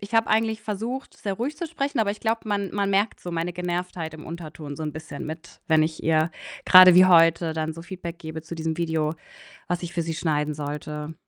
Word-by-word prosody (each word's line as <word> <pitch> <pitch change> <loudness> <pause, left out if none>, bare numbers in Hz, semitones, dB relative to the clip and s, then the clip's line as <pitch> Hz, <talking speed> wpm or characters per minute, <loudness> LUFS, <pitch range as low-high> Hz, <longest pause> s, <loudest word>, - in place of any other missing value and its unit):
Ich 200 +3 -8
habe 225 0 +3
eigentlich 220 0 +1
versucht, 230 +6 -4
sehr 200 -2 -3
ruhig 265 +9 -3
zu 340 - -4
sprechen, 285 -5 -3
aber 210 -3 +2
ich 210 - -12
glaube, 225 0 0
man 200 -2 -1
man 200 -1 0
merkt 200 +3 +1
so 175 - -6
meine 170 +1 -2
Genervtheit 175 -2 -4
im 155 - -10
Unterton 155 -3 -7
so 155 - -5
'n 150 - -3
bisschen 155 -2 -7
mit, 160 +2 -9
wenn 160 -1 +4
ich 155 0 -2
ihr, 160 +1 +3 0.3
grade 185 -1 +9
wie 185 +1 +8
heute, 165 -1 +5
dann 160 0 -2
so 165 +1 -9
Feedback 175 -1 -7
gebe 160 0 -6
zu 165 - -7
diesem 160 -1 -3
Video, 160 -2 0 0.5
was 175 0 -2
ich 175 0 -6
für 170 - 0
sie 165 0 -3
schneiden 150 -2 -1
sollte. 150 +1 -5
170 Hz, 225 wpm, -25 LUFS, 160-200 Hz, 0.5 s, grade